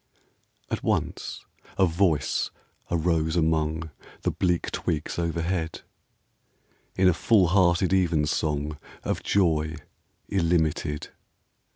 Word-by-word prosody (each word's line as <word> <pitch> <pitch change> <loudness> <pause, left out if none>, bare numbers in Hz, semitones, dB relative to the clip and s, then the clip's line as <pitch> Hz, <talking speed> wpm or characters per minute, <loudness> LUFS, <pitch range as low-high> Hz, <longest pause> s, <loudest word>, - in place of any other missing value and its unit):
At - - -1
once - - -2 0.3
a 95 - +5
voice 80 -5 +1 0.4
arose 80 -1 +1
among 80 -1 0 0.3
The - - +1
bleak 90 -2 0
twigs 75 +2 -2
overhead, 85 0 -2 1.1
In 95 0 +4
a 90 - +5
full 95 0 +3
hearted 90 0 +3
evensong 75 -4 +1 0.2
Of - - -2
joy 80 -5 +1 0.5
illimited. 80 -5 0
80 Hz, 90 wpm, -26 LUFS, 80-90 Hz, 1.1 s, a